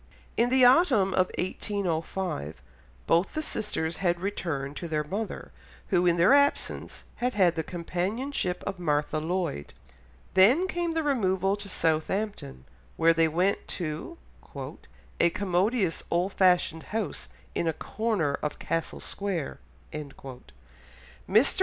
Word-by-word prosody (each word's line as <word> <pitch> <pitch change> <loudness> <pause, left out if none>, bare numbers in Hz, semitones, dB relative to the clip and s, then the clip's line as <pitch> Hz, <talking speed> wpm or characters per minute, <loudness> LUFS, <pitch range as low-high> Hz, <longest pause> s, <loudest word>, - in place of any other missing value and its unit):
In 235 +1 +3
the 260 0 +5
autumn 245 - +5
of 185 0 +2
1805 180 - -2 0.5
both 170 +3 +2
the 310 - -1
sisters 170 - -2
had 175 -2 +1
returned 160 -8 -3
to 170 - -5
their 155 -2 0
mother, 195 - -5 0.4
who 180 +1 +3
in 170 - +4
their 175 +9 +6
absence 285 0 +1
had 250 -1 -1
had 185 -4 +4
the 160 - 0
companionship 180 - -2
of 195 -2 -4
Martha 150 -2 0
Lloyd. 165 - -3 0.6
Then 250 - +5
came 345 -2 -2
the 325 - +1
removal 195 -8 +1
to 205 -1 -7
Southampton, 160 - -1 0.3
where 165 0 +5
they 165 0 +3
went 180 +5 0
to 170 - -4 1.0
"a 170 - +5
commodious 190 +1 0
old 180 +3 0
fashioned 180 -3 +3 0.2
house 220 - -4 0.2
in 170 - -1
a - - +3
corner 205 -7 -1
of 150 - -3
Castle 165 -1 -3
Square." 195 -7 -3 0.3
Mr. 140 -2 -7
185 Hz, 130 wpm, -28 LUFS, 165-210 Hz, 1.0 s, their